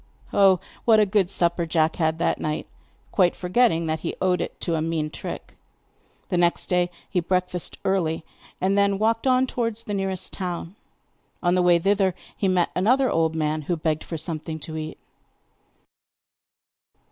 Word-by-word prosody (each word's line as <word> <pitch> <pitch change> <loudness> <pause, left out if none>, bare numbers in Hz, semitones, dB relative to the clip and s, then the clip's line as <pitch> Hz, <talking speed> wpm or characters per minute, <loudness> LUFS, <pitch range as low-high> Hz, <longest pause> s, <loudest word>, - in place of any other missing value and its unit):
Oh, 195 -2 +5 0.2
what 225 -2 +5
a 210 - +5
good 190 -2 +2
supper 170 -2 +1
Jack 160 -1 +1
had 160 -1 +1
that 170 - 0
night, 155 0 -2 0.5
quite 180 -4 +3
forgetting 180 -2 +2
that 160 0 -1
he - - -4
owed 180 -2 +2
it - - -5
to 170 - -1
a 160 - 0
mean 160 -1 -1
trick. - - -7 0.8
The 180 - 0
next 175 0 +1
day 180 -1 +2 0.2
he 180 - 0
breakfasted 180 0 -2
early, 165 -4 0 0.3
and 190 +2 +1
then 200 -1 +3
walked 225 +4 +1
on 255 0 +4
towards 230 -3 -3
the 210 - -5
nearest 190 -2 -3
town. 180 -1 -4 0.7
On 175 - +3
the 180 - +3
way 175 -1 +5
thither 195 +1 +2 0.2
he 195 - 0
met 180 -2 +2
another 255 +8 +3
old 160 -1 +1
man, 155 0 0
who 175 - +1
begged 155 -1 -1
for 165 - -5
something 160 0 -5
to 160 +2 -7
eat. 155 0 -5
180 Hz, 170 wpm, -24 LUFS, 160-195 Hz, 0.8 s, Oh